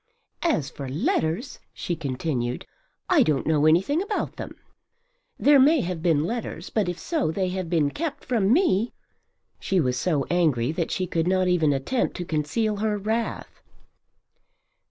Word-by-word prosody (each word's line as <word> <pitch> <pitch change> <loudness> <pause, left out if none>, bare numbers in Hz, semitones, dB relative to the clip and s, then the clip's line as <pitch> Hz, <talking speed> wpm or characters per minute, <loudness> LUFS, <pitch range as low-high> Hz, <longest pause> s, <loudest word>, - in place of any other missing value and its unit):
"As 285 - 0
for 135 -2 -7
letters," 160 - -1 0.2
she 175 - -3
continued, 130 -4 -3 0.4
"I - - +4
don't 150 -4 +1
know 155 -1 +3
anything 190 - +3
about 410 +1 -3
them. - - -7 0.8
There 285 -1 +5
may 295 +3 +5
have 175 -2 -4
been 160 -4 +2
letters 205 -4 -4
but 205 -5 0
if 175 - -4
so 315 - -1
they 185 +3 -1
have 185 -2 -4
been 155 -5 +2
kept 310 - -4
from 225 -6 +1
me." 245 - +2 0.7
She 190 - 0
was 125 -5 0
so 150 -7 0
angry 155 -8 +2
that 165 0 -2
she 185 - -1
could 165 -1 -1
not 185 0 +2
even 165 -4 +3
attempt 140 - -1
to 175 - -4
conceal 170 +8 -1
her 210 0 0
wrath. 220 +3 -3
180 Hz, 155 wpm, -25 LUFS, 155-220 Hz, 0.8 s, There